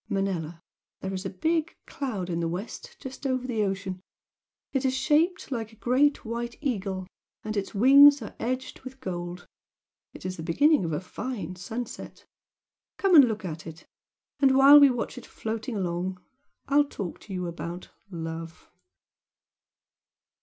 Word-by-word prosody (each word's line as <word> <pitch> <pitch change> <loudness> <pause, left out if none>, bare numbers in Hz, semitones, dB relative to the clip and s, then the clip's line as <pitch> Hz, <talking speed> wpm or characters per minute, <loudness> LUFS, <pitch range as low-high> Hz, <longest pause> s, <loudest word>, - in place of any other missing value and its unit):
"Manella, 180 -5 -2 0.4
there 190 0 -4
is 190 +1 -3
a - - -4
big 320 - -1
cloud 220 - -4
in 170 - -1
the 170 - 0
west 220 - -6
just 265 +1 -6
over 255 -1 -1
the 235 -4 -1
ocean. 195 -2 -2 0.7
It 270 -1 0
is 260 -1 +1
shaped 310 +6 +1
like 225 -3 -3
a - - -17
great 260 +5 +2
white 235 +1 -4
eagle 195 -9 -2 0.4
and 215 0 -4
its 200 +1 -3
wings 280 +6 +8
are 210 - -8
edged 255 +3 -3
with 265 0 -10
gold, 175 -5 -5 0.7
it - - -12
is 185 0 -4
the - - -6
beginning 235 - +3
of 165 - -2
a 150 - -1
fine 190 -1 -5
sunset. 220 +7 -7 0.7
Come 390 -2 +2
and 290 -5 +10
look 215 -4 -3
at 160 -2 -6
it, 160 +1 -10 0.5
and 265 -1 +5
while 280 +2 +10
we 285 -1 +8
watch 245 -2 -3
it - - -14
floating 225 +2 -4
along 185 -1 -2 0.5
I 280 - +2
will 290 - +6
talk 200 - -6
to 200 - -10
you 180 -1 -2
about 170 +1 -6 0.2
love!" 165 -2 -7
220 Hz, 160 wpm, -27 LUFS, 180-265 Hz, 0.7 s, and